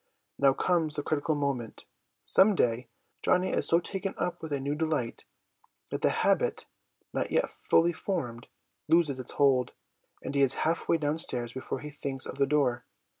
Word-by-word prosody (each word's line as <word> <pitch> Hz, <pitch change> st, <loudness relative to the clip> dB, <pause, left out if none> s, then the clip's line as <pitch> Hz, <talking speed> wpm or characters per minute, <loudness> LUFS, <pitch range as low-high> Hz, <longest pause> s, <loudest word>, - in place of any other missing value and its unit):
Now 135 Hz, -1 st, +4 dB
comes 160 Hz, -1 st, 0 dB
the 145 Hz, -, -3 dB
critical 155 Hz, +1 st, -1 dB
moment. 140 Hz, -6 st, -4 dB, 0.4 s
Some 200 Hz, +2 st, +4 dB
day 120 Hz, -4 st, 0 dB, 0.3 s
Johnny 185 Hz, +1 st, +1 dB
is -, -, +5 dB
so 170 Hz, -, +5 dB
taken 195 Hz, +2 st, -4 dB
up 175 Hz, -1 st, -3 dB
with 160 Hz, -2 st, -7 dB
a 140 Hz, -, -1 dB
new 140 Hz, +2 st, -2 dB
delight 150 Hz, -6 st, -2 dB, 0.7 s
that -, -, -3 dB
the -, -, +3 dB
habit, -, -, 0 dB, 0.5 s
not -, -, -2 dB
yet -, -, 0 dB
fully 170 Hz, +1 st, +1 dB
formed, 130 Hz, -, -4 dB, 0.4 s
loses 155 Hz, -4 st, +2 dB
its 125 Hz, -, -6 dB
hold, 135 Hz, -4 st, +2 dB, 0.5 s
and -, -, -5 dB
he 140 Hz, -, +1 dB
is 135 Hz, -1 st, +5 dB
half 165 Hz, +2 st, -1 dB
way 165 Hz, -, +4 dB
downstairs 145 Hz, -6 st, +3 dB
before 130 Hz, -, -5 dB
he 150 Hz, 0 st, -7 dB
thinks 140 Hz, -2 st, -1 dB
of 135 Hz, -, -8 dB
the 140 Hz, -, +3 dB
door. 135 Hz, -4 st, 0 dB
145 Hz, 175 wpm, -28 LUFS, 130-165 Hz, 0.7 s, is